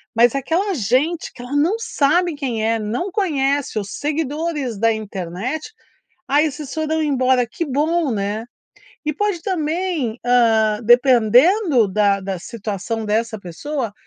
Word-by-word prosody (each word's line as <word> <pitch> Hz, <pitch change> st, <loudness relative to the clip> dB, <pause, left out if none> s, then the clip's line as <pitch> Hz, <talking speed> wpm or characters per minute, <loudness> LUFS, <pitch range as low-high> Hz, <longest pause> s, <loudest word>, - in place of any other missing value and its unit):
mas 235 Hz, +2 st, +4 dB
aquela 335 Hz, +9 st, 0 dB
gente 280 Hz, -, 0 dB
que -, -, -11 dB
ela 250 Hz, +3 st, -5 dB
não 330 Hz, +9 st, +2 dB
sabe 345 Hz, -3 st, +1 dB
quem 245 Hz, -7 st, -2 dB
é, 225 Hz, 0 st, +1 dB
não 235 Hz, -, -3 dB
conhece, 285 Hz, -, 0 dB
os 200 Hz, -1 st, -6 dB
seguidores 295 Hz, -2 st, -2 dB
da 230 Hz, +1 st, +3 dB
internet. 215 Hz, -, -4 dB, 0.6 s
"Aí 290 Hz, +3 st, +4 dB
esses 290 Hz, -1 st, -6 dB
foram 315 Hz, 0 st, -1 dB
embora." 260 Hz, -4 st, +2 dB
Que 285 Hz, +8 st, -4 dB
bom, 305 Hz, +2 st, 0 dB
né? 205 Hz, +1 st, -2 dB, 0.6 s
E 305 Hz, -, 0 dB
pode 410 Hz, 0 st, -1 dB
também, 325 Hz, -, -2 dB
hã, 225 Hz, -3 st, +3 dB
dependendo 250 Hz, -, +4 dB
da 200 Hz, 0 st, +2 dB
da 190 Hz, -1 st, -4 dB
situação 220 Hz, +2 st, -4 dB
dessa 220 Hz, +1 st, -1 dB
pessoa, 230 Hz, -, -4 dB
260 Hz, 135 wpm, -20 LUFS, 220-315 Hz, 0.6 s, mas